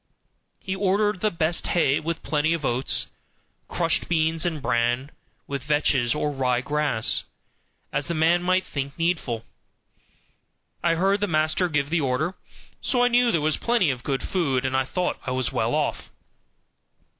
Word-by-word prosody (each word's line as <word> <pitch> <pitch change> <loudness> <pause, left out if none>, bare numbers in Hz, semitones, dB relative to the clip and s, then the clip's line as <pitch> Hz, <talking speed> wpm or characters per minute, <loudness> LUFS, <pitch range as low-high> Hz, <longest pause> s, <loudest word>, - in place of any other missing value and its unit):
He 190 - -3
ordered 200 +1 +1
the 215 - +3
best 165 -2 0
hay 145 -4 +3
with 165 +1 -4
plenty 155 +1 +1
of 160 -4 -3
oats, 125 +2 +1 0.6
crushed 165 -2 0
beans, 160 0 +1
and 160 -3 -2
bran, 120 +2 0 0.3
with 140 -1 -4
vetches, 145 -4 +2
or 150 0 -1
rye 130 -3 +1
grass, 145 -5 +1 0.7
as 145 - -1
the 170 - -2
man 165 +3 +3
might 185 +1 +2
think 140 -3 -5
needful. 160 -10 -1 1.4
I 170 -1 +3
heard 195 +4 +2
the 205 - +1
master 155 +2 +1
give 145 -2 -1
the 165 -1 +2
order, 140 +6 0 0.5
so 245 -2 +1
I 245 - +4
knew 245 0 +4
there 165 - +1
was 155 +1 +1
plenty 230 -10 +2
of 125 -2 -5
good 135 0 -2
food, 135 -8 0
and 130 0 0
I 130 0 +2
thought 180 +6 -2
I 130 - 0
was 130 -1 -1
well - - 0
off. - - -2
155 Hz, 165 wpm, -24 LUFS, 135-175 Hz, 1.4 s, I